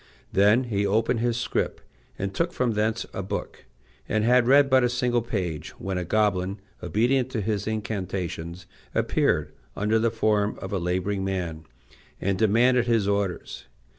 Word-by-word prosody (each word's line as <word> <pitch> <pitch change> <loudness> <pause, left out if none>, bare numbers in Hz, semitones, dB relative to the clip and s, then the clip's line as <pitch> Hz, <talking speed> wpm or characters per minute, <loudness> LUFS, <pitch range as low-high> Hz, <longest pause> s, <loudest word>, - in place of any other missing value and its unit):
Then 105 +6 +5
he 105 -5 -1
opened 110 +3 +1
his 120 0 0
scrip, 120 - -1 0.4
and 100 0 -3
took 170 - -1
from 125 -2 +1
thence 110 +1 0
a - - -3
book, 100 +2 -5 0.4
and 110 0 +1
had 120 +1 +4
read 140 +2 +6
but 130 -1 +4
a 125 - +3
single 125 -1 +1
page 95 -9 -4
when 95 -1 -2
a - - -2
goblin, 100 0 0 0.2
obedient 125 +4 +1
to 115 - 0
his 105 0 -2
incantations, 95 -5 -4 0.3
appeared, - - +1 0.2
under 105 +2 +1
the 115 +1 +2
form 110 -2 +1
of - - -6
a 95 - 0
laboring 95 +3 -1
man, 85 -5 -3 0.5
and 95 0 -1
demanded 120 +3 +4
his 115 -4 +2
orders. 100 -3 -2
105 Hz, 160 wpm, -25 LUFS, 95-120 Hz, 0.5 s, read